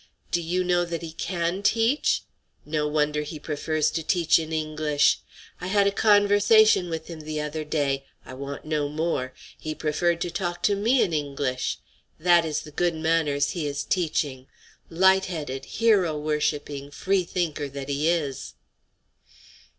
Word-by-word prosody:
Do 175 Hz, -, +1 dB
you 175 Hz, +3 st, -1 dB
know 175 Hz, -1 st, +2 dB
that 170 Hz, -1 st, -4 dB
he 165 Hz, -, -6 dB
can 170 Hz, +2 st, -2 dB
teach? 230 Hz, +7 st, +2 dB, 0.4 s
No 150 Hz, 0 st, -1 dB
wonder 150 Hz, 0 st, +1 dB
he 150 Hz, +1 st, -6 dB
prefers 155 Hz, +1 st, -1 dB
to 165 Hz, -, -2 dB
teach 165 Hz, -1 st, +3 dB
in 160 Hz, 0 st, -5 dB
English! 155 Hz, -2 st, +1 dB, 0.4 s
I 180 Hz, -, -5 dB
had 200 Hz, +1 st, +3 dB
a 200 Hz, -, +3 dB
conversation 205 Hz, -1 st, +5 dB
with 160 Hz, -1 st, -4 dB
him 165 Hz, -2 st, -8 dB
the 155 Hz, 0 st, -4 dB
other 150 Hz, +1 st, -3 dB
day; 140 Hz, -3 st, -1 dB, 0.2 s
I -, -, -9 dB
want 140 Hz, +2 st, -7 dB
no 150 Hz, -2 st, -1 dB
more; 150 Hz, -4 st, -2 dB, 0.3 s
he 155 Hz, 0 st, -5 dB
preferred 165 Hz, +3 st, 0 dB
to 175 Hz, -, -2 dB
talk 175 Hz, -1 st, -3 dB
to 205 Hz, -, +4 dB
me 230 Hz, +6 st, +3 dB
in 170 Hz, -, -2 dB
English. 140 Hz, -3 st, -2 dB, 0.4 s
That 175 Hz, 0 st, +4 dB
is 155 Hz, -1 st, -2 dB
the 150 Hz, -, -11 dB
good 175 Hz, +3 st, 0 dB
manners 160 Hz, -3 st, +1 dB
he 165 Hz, -5 st, -3 dB
is 145 Hz, 0 st, -3 dB
teaching; 150 Hz, -7 st, -1 dB, 0.4 s
light 190 Hz, +3 st, +4 dB
headed, 145 Hz, -6 st, -5 dB
hero 200 Hz, -9 st, +2 dB
worshipping, 150 Hz, -2 st, -2 dB
free 185 Hz, +6 st, 0 dB
thinker 160 Hz, -5 st, -2 dB
that 140 Hz, 0 st, -7 dB
he 145 Hz, +3 st, 0 dB
is." 145 Hz, -, -2 dB
160 Hz, 160 wpm, -25 LUFS, 150-175 Hz, 0.4 s, conversation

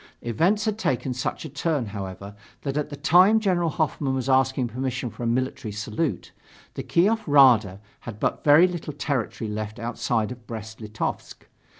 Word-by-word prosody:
Events 175 Hz, -, +1 dB
had 215 Hz, 0 st, -1 dB
taken 130 Hz, -, -1 dB
such 125 Hz, +5 st, -4 dB
a -, -, -6 dB
turn, 145 Hz, -1 st, -1 dB
however, 100 Hz, -1 st, -7 dB, 0.3 s
that 140 Hz, -1 st, -3 dB
at 150 Hz, 0 st, -1 dB
the 145 Hz, -, -6 dB
time 185 Hz, +9 st, +5 dB
General 180 Hz, -5 st, +1 dB
Hoffmann 145 Hz, -3 st, -1 dB
was 130 Hz, 0 st, -3 dB
asking 130 Hz, -1 st, +2 dB
permission 125 Hz, 0 st, -3 dB
for -, -, -11 dB
a 120 Hz, -, -1 dB
military 125 Hz, -1 st, -2 dB
salute, 110 Hz, +9 st, -3 dB, 0.4 s
the -, -, -5 dB
Kiev 175 Hz, -, +2 dB
Rada 120 Hz, -9 st, +5 dB, 0.2 s
had 110 Hz, -3 st, -9 dB
but -, -, -1 dB
very 155 Hz, +5 st, +7 dB
little 175 Hz, -4 st, -5 dB
territory 135 Hz, -6 st, -3 dB
left 105 Hz, 0 st, -5 dB
outside 115 Hz, -1 st, -2 dB
of 120 Hz, -3 st, -10 dB
Brest 110 Hz, -1 st, -8 dB
Litovsk. 110 Hz, 0 st, -5 dB
130 Hz, 170 wpm, -24 LUFS, 110-155 Hz, 0.4 s, very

